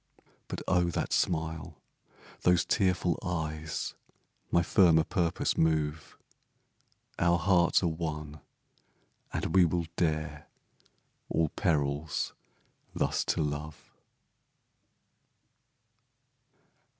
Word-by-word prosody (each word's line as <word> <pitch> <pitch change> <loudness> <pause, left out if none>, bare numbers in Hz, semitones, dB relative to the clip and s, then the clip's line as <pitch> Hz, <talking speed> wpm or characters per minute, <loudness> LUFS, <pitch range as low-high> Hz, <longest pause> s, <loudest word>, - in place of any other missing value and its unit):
But - - -5
oh, 90 -1 +3
that 85 - -2
smile 80 -2 -1 0.6
those 90 -1 +3
tearful 90 -4 +1
eyes, 80 -4 -3 0.6
My 85 - +3
firmer 85 -3 +5
purpose 85 -3 0
move 80 -1 0 1.0
Our 85 0 +4
hearts 90 0 +3
are - - +3
one, 75 -2 -4 0.9
and - - -2
we 95 - +7
will 85 0 +1
dare 80 -3 -1 0.8
All 80 -1 +1
perils 75 -4 -1 0.6
thus - - 0
to - - +1
love! 75 +1 -5
80 Hz, 85 wpm, -30 LUFS, 75-85 Hz, 1.0 s, we